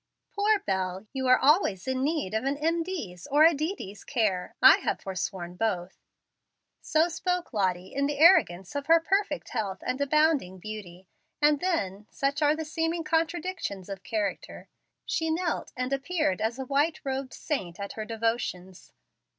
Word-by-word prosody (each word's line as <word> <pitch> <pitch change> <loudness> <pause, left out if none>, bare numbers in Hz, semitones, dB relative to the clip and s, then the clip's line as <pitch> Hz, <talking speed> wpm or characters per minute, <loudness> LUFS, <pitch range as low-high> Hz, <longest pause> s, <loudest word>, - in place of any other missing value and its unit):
Poor 415 +1 +3
Bel, 190 0 -2
you 265 -1 -2
are 255 - +7
always 270 - +3
in 260 0 0
need 295 - -1
of 220 - 0
an 275 +1 -1
M. 330 +3 +1
D.'s 225 - -6
or 295 +2 +5
a 330 +1 +7
D. 315 +6 -2
D.'s 200 - -9
care. 210 -8 -1
I - - +8
have - - -2
forsworn 185 -2 -4
both." 190 -4 -1 0.9
So 315 +2 +2
spoke 360 -1 -2
Lottie 185 -3 -1
in 280 0 +1
the 290 -1 -3
arrogance 195 - +5
of 285 -1 -4
her 330 +1 +7
perfect 345 -3 -1
health 205 -5 -3
and 260 +2 -2
abounding 285 - +2
beauty, 190 -2 -9 0.3
and 295 -1 +4
then 210 - -2
(such 280 +2 -1
are 295 0 +4
the 320 0 -4
seeming 325 +2 -1
contradictions 325 - -2
of 195 -1 -6
character) 210 -1 -4 0.4
she 320 0 -1
knelt 335 +2 -1
and 255 +2 -2
appeared 280 - 0
as 225 +3 -1
a 265 - -4
white 290 +5 +1
robed 265 -1 -3
saint 190 - -4
at 200 0 -5
her 220 - -5
devotions. 220 -5 -3
265 Hz, 165 wpm, -28 LUFS, 195-320 Hz, 0.9 s, I